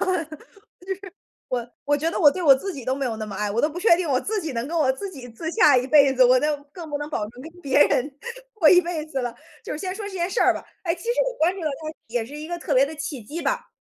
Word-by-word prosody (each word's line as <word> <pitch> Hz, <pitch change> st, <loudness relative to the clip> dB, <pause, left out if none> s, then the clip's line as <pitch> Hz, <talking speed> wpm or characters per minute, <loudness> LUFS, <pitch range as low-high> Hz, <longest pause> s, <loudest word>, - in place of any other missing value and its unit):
就 375 Hz, -, +1 dB
是。 330 Hz, -4 st, -2 dB, 1.2 s
我 245 Hz, -1 st, -3 dB
我 290 Hz, -, +3 dB
觉 310 Hz, +3 st, 0 dB
得 -, -, -3 dB
我 295 Hz, -5 st, +7 dB
对 365 Hz, -, -5 dB
我 285 Hz, -5 st, +7 dB
自 390 Hz, +8 st, -5 dB
己 270 Hz, -, -8 dB
都 260 Hz, +2 st, -1 dB
没 275 Hz, 0 st, -2 dB
有 235 Hz, -3 st, -2 dB
那 215 Hz, -1 st, -5 dB
么 200 Hz, -, -7 dB
爱， 210 Hz, +1 st, -2 dB
我 230 Hz, +3 st, 0 dB
都 300 Hz, -, +2 dB
不 330 Hz, +3 st, -6 dB
确 360 Hz, -2 st, +6 dB
定 345 Hz, -2 st, -2 dB
我 260 Hz, -2 st, +2 dB
自 425 Hz, +5 st, -2 dB
己 315 Hz, -5 st, -4 dB
能 235 Hz, +2 st, -3 dB
跟 335 Hz, -, -4 dB
我 295 Hz, -5 st, +3 dB
自 395 Hz, +10 st, -6 dB
己 260 Hz, -7 st, -10 dB
自 320 Hz, +8 st, -5 dB
洽 430 Hz, -, +5 dB
一 250 Hz, -, +1 dB
辈 280 Hz, 0 st, +6 dB
子， 260 Hz, -1 st, +5 dB
我 255 Hz, +1 st, +5 dB
那 300 Hz, +2 st, +1 dB, 0.2 s
更 335 Hz, -1 st, -9 dB
不 290 Hz, -, -2 dB
能 295 Hz, -, -5 dB
保 -, -, -1 dB
证 245 Hz, +2 st, -13 dB
跟 320 Hz, -, -9 dB
别 275 Hz, -2 st, 0 dB
人 270 Hz, +4 st, 0 dB, 0.4 s
过 365 Hz, -8 st, +4 dB
一 360 Hz, +3 st, +7 dB
辈 335 Hz, -3 st, -4 dB
子 275 Hz, -4 st, -3 dB
了。 245 Hz, -1 st, -4 dB, 0.3 s
就 -, -, -6 dB
是 -, -, -3 dB
先 370 Hz, +3 st, -4 dB
说 415 Hz, +2 st, -7 dB
这 -, -, -8 dB
件 350 Hz, -2 st, -1 dB
事 385 Hz, -, -1 dB
儿 -, -, +6 dB
吧， -, -, -6 dB, 0.2 s
哎， 335 Hz, -2 st, -1 dB
其 345 Hz, -, -13 dB
实 465 Hz, -, -3 dB, 0.2 s
我 -, -, 0 dB
关 335 Hz, +3 st, +2 dB
注 380 Hz, -, -8 dB
到 315 Hz, -, 0 dB
它 310 Hz, +2 st, -5 dB
也 230 Hz, 0 st, -2 dB
是 280 Hz, +5 st, -10 dB
一 305 Hz, +1 st, -7 dB
个 345 Hz, 0 st, -4 dB
特 330 Hz, -3 st, -2 dB
别 260 Hz, 0 st, +5 dB
的 295 Hz, +3 st, -3 dB
契 290 Hz, -3 st, -5 dB
机 295 Hz, +10 st, -7 dB
吧， 485 Hz, +7 st, -2 dB
300 Hz, 335 characters per minute, -24 LUFS, 260-345 Hz, 1.2 s, 我